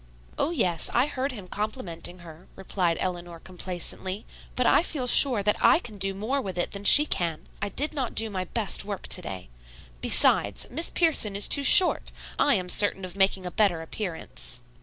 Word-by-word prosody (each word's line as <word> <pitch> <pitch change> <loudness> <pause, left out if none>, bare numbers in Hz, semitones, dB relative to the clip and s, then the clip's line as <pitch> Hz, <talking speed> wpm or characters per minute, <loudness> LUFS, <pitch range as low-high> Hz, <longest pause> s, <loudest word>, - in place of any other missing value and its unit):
"Oh, - - -1
yes; 185 - -1
I 245 +2 +2
heard 275 -1 -5
him 205 -7 -11
complimenting 190 -5 -7
her," 165 +2 -15
replied 180 -3 -3
Eleanor 175 -2 -6
complacently, 185 +2 -6 0.3
"but 250 - -1
I - - +3
feel 295 -6 -4
sure 245 -3 +6
that 210 +1 0
I - - +5
can 220 - -10
do 195 0 0
more 240 +8 -3
with 190 -6 -8
it 175 - -2
than 200 0 -9
she 295 +7 +8
can. 170 - -4 0.2
I 200 - -4
did 290 +11 -2
not 265 -6 -5
do 225 -1 +3
my 185 -2 -5
best 215 +2 -1
work 200 -2 -8
to 180 - 0
day. 95 - -9 0.5
Besides, 100 -1 +4
Miss 320 +7 0
Pierson 300 - +1
is 200 - +1
too 285 - +3
short. 365 +6 +6 0.3
I 285 - +2
am 185 -3 -4
certain 195 0 +2
of 180 0 -10
making 195 -1 0
a 180 - -6
better 180 -6 -1
appearance." 165 - -8
200 Hz, 190 wpm, -24 LUFS, 180-250 Hz, 0.5 s, she